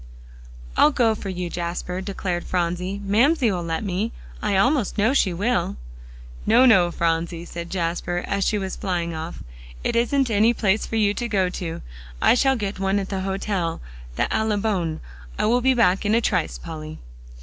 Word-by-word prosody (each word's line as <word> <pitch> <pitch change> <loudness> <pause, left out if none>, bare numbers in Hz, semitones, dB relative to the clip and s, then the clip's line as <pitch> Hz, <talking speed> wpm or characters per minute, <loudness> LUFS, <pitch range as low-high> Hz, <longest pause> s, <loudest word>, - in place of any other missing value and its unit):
"I'll - - +6
go 240 -6 +2
for 205 -2 -6
you, 180 -1 -3
Jasper," 180 +1 -3
declared 185 -2 -3
Phronsie; 180 +2 -2
"Mamsie 235 +5 +3
will 180 -2 -2
let 165 +3 -3
me; 200 +3 -1 0.3
I 205 -2 +1
almost 250 +1 +2
know 220 +5 +3
she 200 -9 +3
will." 205 - 0 0.7
"No, 240 +4 +5
no, 190 -8 +6
Phronsie," 170 0 -1
said 170 0 -7
Jasper, 175 0 -2
as 200 0 -1
she 210 - +1
was 190 -2 -3
flying 175 -4 -2
off; 160 +1 -6 0.4
"it - - -1
isn't 245 +2 +2
any 220 +3 +4
place 210 0 +1
for - - -4
you 210 -2 +3
to 240 +2 -3
go 195 -5 +1
to. 175 -3 -5 0.4
I - - +5
shall 265 +2 +3
get 205 -4 -4
one 195 +1 +1
at 195 -1 -2
the 195 -2 -2
hotel 190 -3 -2 0.4
the - - +1
Allibone. 205 -7 0 0.4
I'll 240 +3 +2
be 260 +1 +3
back 195 -5 +3
in 210 +1 +2
a - - +4
trice, 180 -7 0
Polly." 155 -2 -8
195 Hz, 175 wpm, -23 LUFS, 175-220 Hz, 0.7 s, I'll